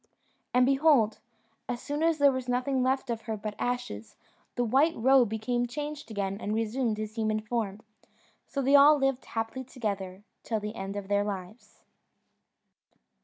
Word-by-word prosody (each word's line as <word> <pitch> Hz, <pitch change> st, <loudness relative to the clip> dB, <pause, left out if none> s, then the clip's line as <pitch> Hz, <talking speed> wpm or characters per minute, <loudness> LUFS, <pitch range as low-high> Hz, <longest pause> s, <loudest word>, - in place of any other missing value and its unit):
And 250 Hz, 0 st, +4 dB
behold! 270 Hz, -5 st, +3 dB, 0.5 s
as 240 Hz, -, -2 dB
soon 290 Hz, +4 st, -4 dB
as 330 Hz, -1 st, +3 dB
there 285 Hz, -1 st, +5 dB
was 260 Hz, -1 st, -4 dB
nothing 255 Hz, +2 st, 0 dB
left 260 Hz, 0 st, 0 dB
of 230 Hz, -1 st, -3 dB
her 220 Hz, -, -1 dB
but 210 Hz, 0 st, -5 dB
ashes, 110 Hz, -, -4 dB, 0.4 s
the 245 Hz, -, +1 dB
white 275 Hz, +8 st, +3 dB
roe 260 Hz, +2 st, +5 dB
became 240 Hz, +3 st, -1 dB
changed 295 Hz, +3 st, -6 dB
again 200 Hz, -1 st, -3 dB
and 210 Hz, +1 st, -2 dB
resumed 225 Hz, 0 st, -1 dB
his 215 Hz, +1 st, -6 dB
human 215 Hz, -1 st, 0 dB
form; 215 Hz, -2 st, -3 dB, 0.7 s
so 275 Hz, -, -3 dB
they 275 Hz, +2 st, +2 dB
all 290 Hz, +2 st, +8 dB
lived 270 Hz, -2 st, 0 dB
happily 225 Hz, +3 st, -4 dB
together 200 Hz, -6 st, -5 dB, 0.2 s
till 220 Hz, -2 st, -2 dB
the 210 Hz, +1 st, -5 dB
end 195 Hz, -1 st, -5 dB
of 200 Hz, -1 st, -5 dB
their 205 Hz, 0 st, +2 dB
lives. 200 Hz, +2 st, -7 dB
235 Hz, 165 wpm, -28 LUFS, 210-265 Hz, 0.7 s, all